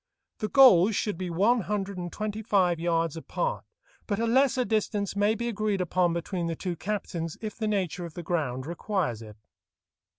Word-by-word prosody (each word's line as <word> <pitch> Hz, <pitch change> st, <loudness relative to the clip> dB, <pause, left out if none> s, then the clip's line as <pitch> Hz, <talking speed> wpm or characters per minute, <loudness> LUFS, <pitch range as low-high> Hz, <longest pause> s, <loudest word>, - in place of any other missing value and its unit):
The 215 Hz, -, -1 dB
goals 225 Hz, -7 st, +6 dB
should 210 Hz, -2 st, -1 dB
be 180 Hz, +1 st, -4 dB
one 210 Hz, +8 st, +3 dB
hundred 200 Hz, -1 st, -3 dB
and 175 Hz, -1 st, -5 dB
twenty 215 Hz, 0 st, -4 dB
five 185 Hz, -6 st, +2 dB
yards 165 Hz, -2 st, 0 dB
apart, -, -, -3 dB, 0.4 s
but 205 Hz, -, -1 dB
a 230 Hz, -, 0 dB
lesser 255 Hz, +1 st, +3 dB
distance 210 Hz, -3 st, -1 dB
may 205 Hz, +2 st, +2 dB
be 235 Hz, +2 st, -3 dB
agreed 215 Hz, -3 st, -1 dB
upon 180 Hz, 0 st, +1 dB
between 170 Hz, +1 st, -3 dB
the 165 Hz, -, -2 dB
two 180 Hz, +1 st, -4 dB
captains 170 Hz, -4 st, -4 dB
if 215 Hz, -1 st, -5 dB
the 220 Hz, -, -2 dB
nature 190 Hz, -4 st, -1 dB
of 165 Hz, -, -10 dB
the 175 Hz, -, -6 dB
ground 145 Hz, -7 st, -2 dB
requires 170 Hz, -, -2 dB
it. 105 Hz, -1 st, -11 dB
195 Hz, 185 wpm, -27 LUFS, 170-215 Hz, 0.4 s, goals